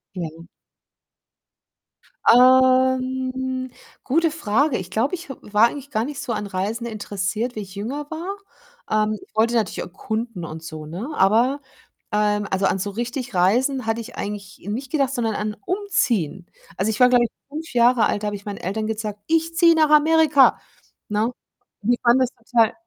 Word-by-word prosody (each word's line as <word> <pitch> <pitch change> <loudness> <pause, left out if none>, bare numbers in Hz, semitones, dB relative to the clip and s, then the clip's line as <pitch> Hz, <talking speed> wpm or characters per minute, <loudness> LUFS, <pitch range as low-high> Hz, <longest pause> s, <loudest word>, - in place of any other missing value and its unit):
Mhm. 165 -1 -7 1.8
Ähm, 260 0 +3 0.3
gute 325 +5 +2
Frage. 275 -1 +1
Ich 185 0 -7
glaube, 230 - 0
ich 345 -3 -11
w 270 - -5
war 210 +2 +4
eigentlich 280 +1 -9
gar 220 0 -1
nicht 290 -1 -6
so 235 - -3
an 210 -1 -3
Reisen 200 +4 -3
interessiert, 215 +1 -3
wie 215 - -4
ich 190 -2 -10
jünger 265 +9 -4
war. 350 +5 -4 0.5
Ähm, 215 0 +2
ich - - -19
wollte 230 +2 +2
natürlich 220 -4 0
erkunden 220 0 -4
und 160 0 -8
so, 155 -1 -8
ne? 180 - -6
Aber, 235 +8 +3 0.5
ähm, 210 -1 +1
also, 190 +1 +1
an - - +1
so 205 +2 -3
richtig 240 +2 -4
Reisen, 250 +9 +2
hatte 225 +1 0
ich 235 - -11
eigentlich 205 0 -6
nicht 250 +6 -4
gedacht, 275 -4 +1
sondern 225 -4 -1
an 210 0 -3
umziehen. 245 - 0 0.3
Also, 195 +3 0
ich 215 - -5
war, 250 0 +7
glaube 245 -1 +4
ich, 225 - -6 0.2
5 310 +2 -7
Jahre 240 -1 +4
alt, 205 - -1
da - - 0
habe 205 - -2
ich 200 - -10
meinen 205 -1 -5
Eltern 215 +4 -3
gesagt: 215 -1 -4
„Ich 330 +1 +1
ziehe 335 -1 +6
nach 310 -2 +3
Amerika.“ 305 -2 +5 0.5
Ne? 215 +3 0 0.5
Die 240 +3 +2
fanden 240 +2 +5
das 255 -2 +2 0.2
total 230 -2 +4
235 Hz, 175 wpm, -22 LUFS, 210-260 Hz, 1.8 s, war